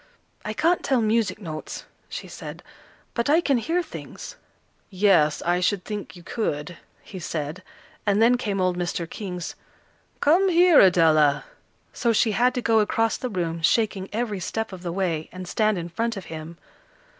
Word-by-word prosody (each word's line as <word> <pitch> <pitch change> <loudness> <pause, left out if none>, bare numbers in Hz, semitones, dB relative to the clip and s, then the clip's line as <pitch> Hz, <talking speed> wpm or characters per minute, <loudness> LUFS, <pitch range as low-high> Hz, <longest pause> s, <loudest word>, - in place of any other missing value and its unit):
"I 215 - -3
can't 335 +9 +2
tell 265 -2 +2
music 220 -3 +1
notes," 155 -6 -7 0.2
she - - -6
said, - - -9 0.5
"but 235 +2 -1
I 310 +3 +5
can 280 -7 +2
hear 335 +9 0
things." 320 - -9 0.5
"Yes, 185 -6 +3
I 175 +1 +1
should 185 0 0
think 210 -2 -6
you 175 - -13
could," 170 -5 -3 0.3
he 190 - -9
said. 160 0 -4 0.4
And 205 0 +2
then 235 +2 +5
came 210 -5 -2
old 185 -1 +1
Mr. 175 -1 -2
King's 180 -2 -6 0.7
"Come 360 +6 +4
here, 350 -2 +6
Adela," 155 -6 +5 0.5
so 235 -2 +1
she 220 +1 +3
had 245 +5 +2
to 250 - -2
go 225 -1 +4
across 225 +1 +1
the 255 - -4
room, 170 -5 -2
shaking 195 +2 +1
every 215 -3 -2
step 220 +3 -3
of 185 - -8
the 175 -1 -4
way, 170 -4 -2
and 185 0 -8
stand 215 +2 +1
in 170 -1 -4
front 230 +6 -2
of 190 - -7
him. 160 +1 -8
200 Hz, 170 wpm, -24 LUFS, 175-230 Hz, 0.7 s, here